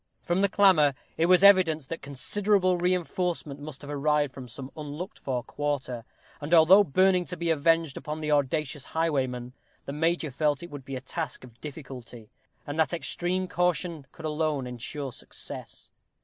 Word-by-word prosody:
From 175 Hz, +2 st, +1 dB
the 200 Hz, -, +3 dB
clamor, 170 Hz, -9 st, +5 dB, 0.2 s
it 165 Hz, -, +2 dB
was 185 Hz, +1 st, +5 dB
evident 170 Hz, -8 st, +6 dB
that 165 Hz, -, -5 dB
considerable 185 Hz, +7 st, +1 dB
reinforcement 175 Hz, -4 st, -1 dB
must 145 Hz, -1 st, -8 dB
have 145 Hz, -, -7 dB
arrived 145 Hz, -1 st, +1 dB
from 130 Hz, -2 st, -9 dB
some 130 Hz, +3 st, -8 dB
unlooked 155 Hz, +5 st, -7 dB
for 125 Hz, -3 st, -2 dB
quarter; 130 Hz, -5 st, -3 dB, 0.4 s
and, 150 Hz, +4 st, +2 dB
although 175 Hz, +5 st, +8 dB
burning 185 Hz, +2 st, +3 dB
to 180 Hz, -, -5 dB
be 170 Hz, 0 st, 0 dB
avenged 165 Hz, -1 st, +2 dB
upon 150 Hz, +1 st, -5 dB
the 155 Hz, -1 st, -2 dB
audacious 145 Hz, 0 st, 0 dB
highwayman, 130 Hz, -6 st, 0 dB, 0.3 s
the 140 Hz, -, -5 dB
major 165 Hz, 0 st, 0 dB
felt 145 Hz, +2 st, 0 dB
it 170 Hz, -, -9 dB
would 145 Hz, -3 st, -8 dB
be 135 Hz, -, -5 dB
a 130 Hz, -, -5 dB
task 145 Hz, +1 st, -5 dB
of 120 Hz, -2 st, -15 dB
difficulty, 130 Hz, -7 st, -9 dB, 0.3 s
and 145 Hz, +2 st, -5 dB
that 160 Hz, -, +2 dB
extreme 175 Hz, +4 st, -1 dB
caution 170 Hz, -4 st, -1 dB
could 160 Hz, -, -10 dB
alone 150 Hz, -3 st, -1 dB
ensure 125 Hz, +3 st, -4 dB
success. -, -, -8 dB
150 Hz, 165 wpm, -27 LUFS, 140-175 Hz, 0.4 s, although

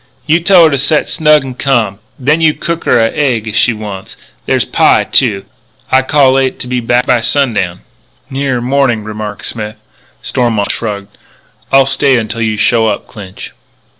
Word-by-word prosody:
You 160 Hz, +2 st, +3 dB
tell 175 Hz, 0 st, +5 dB
her 160 Hz, -, +4 dB
to 140 Hz, -, 0 dB
set 150 Hz, +3 st, +1 dB
snug 150 Hz, -2 st, +3 dB
and 130 Hz, -2 st, -7 dB
ca'm. 120 Hz, -8 st, 0 dB, 0.2 s
Then 150 Hz, +5 st, +1 dB
you 155 Hz, -1 st, +3 dB
cook 170 Hz, 0 st, -4 dB
her -, -, +3 dB
a 115 Hz, 0 st, +2 dB
egg 125 Hz, -7 st, -1 dB
if 110 Hz, -, -5 dB
she 120 Hz, +2 st, +3 dB
wants 105 Hz, -3 st, -7 dB
it. -, -, -31 dB, 0.3 s
There's -, -, +1 dB
pie, -, -, +3 dB
too. 105 Hz, -7 st, +1 dB, 0.5 s
I 130 Hz, -, +5 dB
cal'late 135 Hz, -1 st, +2 dB
to -, -, -6 dB
be 125 Hz, 0 st, -1 dB
back 120 Hz, +1 st, +1 dB
by 120 Hz, -3 st, +2 dB
sundown." 110 Hz, -9 st, 0 dB, 0.5 s
"Nearer 135 Hz, -2 st, -2 dB
morning," 125 Hz, -3 st, 0 dB
remarked 105 Hz, -1 st, -6 dB
Smith. 110 Hz, -2 st, -5 dB, 0.5 s
Stormont 115 Hz, -5 st, -1 dB
shrugged. 100 Hz, -2 st, -5 dB, 0.6 s
"I'll 135 Hz, 0 st, +5 dB
stay 135 Hz, -1 st, +2 dB
until 115 Hz, 0 st, -3 dB
you 110 Hz, -1 st, -1 dB
show 115 Hz, +1 st, +2 dB
up, -, -, -2 dB
Clinch." 95 Hz, -3 st, -10 dB
125 Hz, 175 wpm, -12 LUFS, 110-140 Hz, 0.6 s, tell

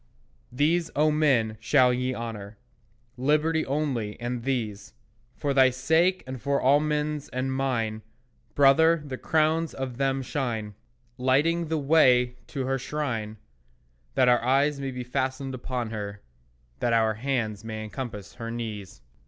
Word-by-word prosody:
These, 160 Hz, +6 st, +1 dB
O 155 Hz, +1 st, +3 dB
men, 130 Hz, -8 st, +2 dB
shall 125 Hz, +1 st, +4 dB
ye 125 Hz, +1 st, -1 dB
honour, 105 Hz, -3 st, -6 dB, 0.6 s
Liberty 155 Hz, +4 st, +2 dB
only, 130 Hz, -8 st, -2 dB
and 120 Hz, 0 st, -3 dB
these. 115 Hz, -6 st, -3 dB, 0.4 s
For 140 Hz, -1 st, -1 dB
thy 130 Hz, -1 st, +6 dB
sake 160 Hz, +9 st, +2 dB
and 130 Hz, -2 st, -7 dB
for 140 Hz, 0 st, +1 dB
all 140 Hz, +3 st, +4 dB
men's 150 Hz, -1 st, -2 dB
and 130 Hz, +1 st, -2 dB
mine, 115 Hz, -5 st, -1 dB, 0.5 s
Brother, 155 Hz, +3 st, +5 dB
the 130 Hz, -3 st, -6 dB
crowns 160 Hz, +1 st, +1 dB
of 130 Hz, -3 st, -5 dB
them 135 Hz, 0 st, 0 dB
shine 120 Hz, -6 st, -3 dB, 0.5 s
Lighting 150 Hz, +7 st, +2 dB
the 160 Hz, +1 st, -1 dB
way 130 Hz, -5 st, +4 dB
to 135 Hz, -2 st, -4 dB
her 135 Hz, +1 st, -1 dB
shrine, 115 Hz, -7 st, -3 dB, 0.8 s
That 130 Hz, -, +4 dB
our 120 Hz, -1 st, +4 dB
eyes 140 Hz, +3 st, +2 dB
may 135 Hz, -1 st, -3 dB
be 125 Hz, -1 st, -5 dB
fastened 130 Hz, +1 st, -2 dB
upon 125 Hz, -2 st, -4 dB
her, 105 Hz, -2 st, -6 dB, 0.6 s
That 120 Hz, -1 st, +1 dB
our 110 Hz, -1 st, +3 dB
hands 110 Hz, -3 st, -2 dB
may 110 Hz, -1 st, -5 dB
encompass 110 Hz, -4 st, -7 dB
her 115 Hz, -1 st, -6 dB
knees. 110 Hz, -, -6 dB
130 Hz, 145 wpm, -26 LUFS, 115-145 Hz, 0.8 s, thy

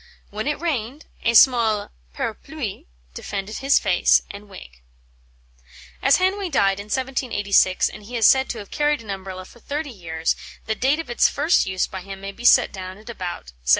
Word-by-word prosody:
When 215 Hz, +4 st, -4 dB
it 295 Hz, -, -1 dB
rained, 290 Hz, -4 st, -3 dB, 0.2 s
a 230 Hz, -, +1 dB
small 225 Hz, -4 st, +4 dB, 0.2 s
parapluie 235 Hz, -, -5 dB, 0.3 s
defended 200 Hz, -, -5 dB
his 275 Hz, +1 st, +4 dB
face 180 Hz, -2 st, +3 dB
and 205 Hz, +1 st, -11 dB
wig." 60 Hz, -, -13 dB, 1.2 s
As 275 Hz, +1 st, +5 dB
Hanway 380 Hz, +1 st, 0 dB
died 195 Hz, -, +2 dB
in 200 Hz, -, -7 dB
1786, 215 Hz, -6 st, +1 dB
and 215 Hz, -, -9 dB
he 235 Hz, +4 st, -6 dB
is 225 Hz, -, +3 dB
said 265 Hz, 0 st, +5 dB
to 235 Hz, -, -3 dB
have 205 Hz, -2 st, -9 dB
carried 295 Hz, -4 st, 0 dB
an 210 Hz, -, -6 dB
Umbrella 190 Hz, -1 st, -7 dB
for 240 Hz, -, -17 dB
thirty 290 Hz, +3 st, -4 dB
years, 165 Hz, -6 st, -2 dB, 0.3 s
the 220 Hz, -, 0 dB
date 265 Hz, +6 st, +1 dB
of 325 Hz, -6 st, -6 dB
its 240 Hz, -, +4 dB
first 305 Hz, -, +2 dB
use 185 Hz, -1 st, 0 dB
by 190 Hz, -, -7 dB
him 195 Hz, +1 st, -9 dB
may 195 Hz, 0 st, -6 dB
be 235 Hz, +4 st, -11 dB
set -, -, +6 dB
down 185 Hz, 0 st, -7 dB
at 215 Hz, +3 st, -10 dB
about 175 Hz, -, -7 dB
1750. -, -, -7 dB
215 Hz, 185 wpm, -22 LUFS, 195-270 Hz, 1.2 s, set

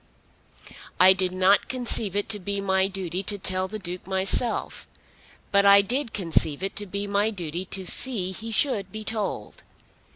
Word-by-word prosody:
"I 185 Hz, +1 st, +8 dB
did 185 Hz, -1 st, +1 dB
not 185 Hz, +2 st, +3 dB
conceive 235 Hz, -6 st, -1 dB
it 205 Hz, -, 0 dB
to 210 Hz, -, -1 dB
be 200 Hz, +1 st, -3 dB
my 190 Hz, -1 st, +1 dB
duty 185 Hz, -2 st, -4 dB
to 205 Hz, +1 st, -1 dB
tell 185 Hz, -1 st, -2 dB
the 215 Hz, +3 st, -6 dB
Duke 180 Hz, -2 st, -6 dB
myself, 195 Hz, +5 st, -1 dB, 0.6 s
but 200 Hz, -1 st, +4 dB
I 200 Hz, 0 st, +7 dB
did 250 Hz, +3 st, -1 dB
conceive 165 Hz, -4 st, 0 dB
it 195 Hz, -, -3 dB
to 205 Hz, -, -2 dB
be 200 Hz, +2 st, -4 dB
my 205 Hz, +1 st, 0 dB
duty 175 Hz, -3 st, -5 dB
to 190 Hz, 0 st, -4 dB
see 195 Hz, -3 st, +3 dB
he 225 Hz, +4 st, -8 dB
should 215 Hz, -6 st, 0 dB
be 215 Hz, +1 st, -7 dB
told. 215 Hz, -1 st, -5 dB
195 Hz, 170 wpm, -24 LUFS, 185-210 Hz, 0.6 s, I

